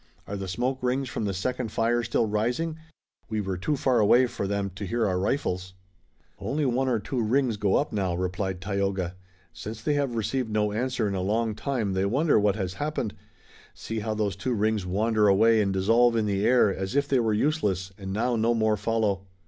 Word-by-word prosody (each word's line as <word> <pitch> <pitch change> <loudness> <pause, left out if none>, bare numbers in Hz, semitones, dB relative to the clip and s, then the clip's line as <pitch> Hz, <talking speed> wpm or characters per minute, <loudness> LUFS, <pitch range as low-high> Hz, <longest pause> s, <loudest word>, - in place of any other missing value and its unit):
Are 100 - -5
the 95 -1 -5
smoke 125 +8 -2
rings 130 +1 0
from 110 - -3
the 100 - -1
second 125 +3 -2
fire 115 +2 +1
still 115 0 +1
rising? 120 +10 -1 0.5
We 110 -1 -1
were 95 -2 -2
too 120 +12 -1
far 130 -2 +2
away 120 +4 +5
for 120 -5 -4
them 100 -1 -2
to 95 +3 -6
hear 115 +4 0
our 90 -3 0
rifles." 95 -4 -2 0.6
"Only 140 +10 -1
one 130 +1 +1
or 120 - +2
two 120 +4 -3
rings 120 +1 +1
go 100 -2 +1
up 145 - 0
now," 95 -4 0
replied 95 +1 -2
Tayoga. 95 -2 -1 0.4
"Since 110 +7 -7
they 150 - +1
have 140 -4 0
received 115 +2 -1
no 105 -1 +1
answer 120 0 -1
in 100 - -2
a 95 - -1
long 110 +3 0
time 115 -4 -2
they 95 +1 +1
wonder 140 +5 +3
what 100 -1 +2
has 95 -4 -3
happened. 145 -7 -2 0.6
See 115 0 -4
how 110 0 -2
those 105 -3 -1
two 125 +4 -2
rings 105 -2 0
wander 105 +3 +2
away 110 +3 +5
and 100 -2 +1
dissolve 115 +5 +3
in 110 -2 +1
the 100 0 +1
air, 120 -5 +4
as 95 +6 -4
if 140 0 +2
they 135 -2 +2
were 115 -2 +1
useless, 105 - 0
and 95 -1 -7
now 120 +5 0
no 115 +1 +2
more 110 -1 +2
follow." 105 -3 0
110 Hz, 210 wpm, -26 LUFS, 100-120 Hz, 0.6 s, away